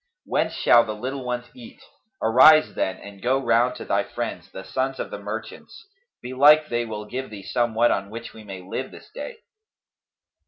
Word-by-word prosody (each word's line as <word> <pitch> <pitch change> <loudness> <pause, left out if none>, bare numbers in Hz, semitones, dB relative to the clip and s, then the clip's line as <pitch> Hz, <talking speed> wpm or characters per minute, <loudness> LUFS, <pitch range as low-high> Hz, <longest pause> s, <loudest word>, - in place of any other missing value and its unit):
Whence - - 0
shall 120 - +5
the 110 -2 -5
little 130 +4 -5
ones 125 0 -3
eat? 250 +1 -13 0.4
Arise 145 +8 +6
then, 100 +1 -4
go 125 +6 +1
round 120 -1 +2
to - - -8
thy - - +1
friends, - - -6
the 95 - -8
sons 130 +6 -2
of - - -5
the 105 - -6
merchants: 110 - -8 0.4
belike 145 +5 +5
they 120 0 -1
will 105 -1 -6
give 130 +5 -5
thee 100 -2 -9
somewhat 120 +1 +1
on 100 0 -2
which 115 +2 -8
we 110 - -12
may 95 -3 -8
live 115 +8 -5
this - - -15
day." 475 -2 -8
120 Hz, 180 wpm, -24 LUFS, 105-130 Hz, 0.4 s, Arise